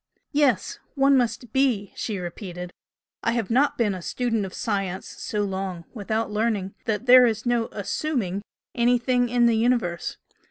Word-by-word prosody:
"Yes 285 -7 +1 0.2
one 275 0 +5
must 240 -2 0
be!" 245 -8 +1
she 215 -3 -3
repeated 180 0 -6 0.5
"I 230 - +1
have 230 -3 -2
not 275 +5 +3
BEEN 215 -4 +2
A 185 - -6
STUDENT 225 0 -1
OF 185 - -11
SCIENCE 190 -2 -2
SO 210 -1 -3
LONG 190 -3 -4
WITHOUT 220 0 -2
LEARNING 210 -3 -1
that 220 +2 -1
there 250 0 +8
is 220 0 -2
no 240 -1 +1
'assuming' 205 - -2 0.3
anything 245 0 +2
in 240 0 +3
the 235 -1 +4
universe. 220 -7 0
225 Hz, 155 wpm, -25 LUFS, 195-245 Hz, 0.5 s, there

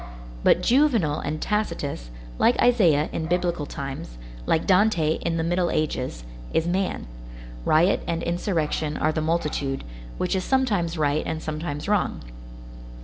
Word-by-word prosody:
But - - +4
Juvenal 235 - +3
and 155 +2 -3
Tacitus, 150 - -2 0.3
like 240 - +4
Isaiah 175 -12 +4
in 160 - -2
Biblical 175 -3 0
times, 135 - -6 0.3
like 160 - +2
Dante 185 -5 +3
in 165 -1 -1
the 165 - 0
Middle 175 +1 +1
Ages, 125 - -2 0.3
is 160 - +2
man; 185 - -1 0.6
riot 170 +5 +4
and 165 0 -1
insurrection 160 -4 -1
are 155 - +1
the 155 - -2
multitude, 150 -4 -1 0.3
which 180 +1 0
is 185 - 0
sometimes 205 -11 +1
right 150 0 +1
and 160 - -2
sometimes 155 -1 -4
wrong. 205 -2 0
165 Hz, 140 wpm, -24 LUFS, 150-185 Hz, 0.6 s, But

